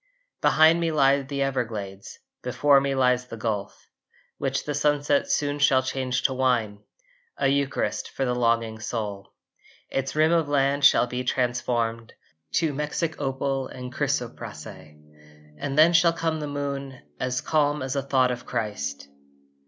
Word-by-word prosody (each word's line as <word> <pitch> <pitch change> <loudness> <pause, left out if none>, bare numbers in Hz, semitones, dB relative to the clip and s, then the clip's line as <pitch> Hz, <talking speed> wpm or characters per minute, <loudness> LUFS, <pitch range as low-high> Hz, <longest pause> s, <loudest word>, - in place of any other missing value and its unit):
Behind 160 +2 +5
me 165 -1 0
lie 140 -2 +3
the 140 0 -2
Everglades, 110 -7 -4 0.2
Before 135 +3 +3
me 140 0 -1
lies 125 -1 +2
the 115 - -8
Gulf, 105 -3 -4 0.5
Which 135 0 -2
the 150 - -2
sunset 145 0 +1
soon 145 0 0
shall 130 -2 +4
change 130 -1 -2
to 135 - +2
wine, 120 -6 0 0.6
A - - +2
Eucharist 140 0 -1
for 135 - -2
the 125 - 0
longing 115 -2 0
soul. 105 -3 -5 0.6
Its 135 +1 -2
rim 155 +1 +4
of 165 -3 +2
land 140 0 +1
shall 125 - +6
be 125 +1 -4
transformed 120 -2 -1 0.4
To 160 -3 +1
Mexic 150 +3 -2
opal 135 -1 -2
and 125 -1 -8
chrysoprase, - - -3
And 75 - -10
then 160 +3 +6
shall 170 0 +5
come 165 -1 -2
the 150 - -4
moon 140 -2 -4 0.2
As 125 0 -1
calm 150 -2 +1
as 130 +1 -3
a 140 - +1
thought 130 -2 +2
of 125 0 -5
Christ. 70 -10 -4
130 Hz, 150 wpm, -25 LUFS, 115-145 Hz, 0.6 s, shall